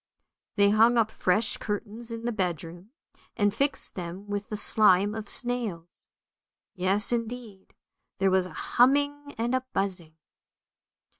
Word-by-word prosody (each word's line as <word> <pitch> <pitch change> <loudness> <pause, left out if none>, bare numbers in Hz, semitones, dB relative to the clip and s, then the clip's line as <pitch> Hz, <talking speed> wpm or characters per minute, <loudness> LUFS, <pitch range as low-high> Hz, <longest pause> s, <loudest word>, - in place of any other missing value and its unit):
They 200 -1 +4
hung 225 +3 +4
up 220 -1 +2
fresh 210 +4 0
curtains 215 +2 -4
in 230 0 -6
the 240 - 0
bedroom, 175 -2 -4 0.5
and 205 -2 +2
fixed 275 +3 +1
them 180 +2 -7
with 205 0 -4
the 210 - -4
slime 205 -1 +4
of 215 -2 -7
snails. 225 -9 -4 0.7
Yes, 190 +4 +1
indeed, 230 -4 -5 0.4
there 195 0 +2
was 185 -1 +2
a - - -13
humming 285 +3 +1
and 235 +2 -1
a 260 - +1
buzzing. 180 -5 -3
210 Hz, 135 wpm, -27 LUFS, 190-235 Hz, 0.7 s, They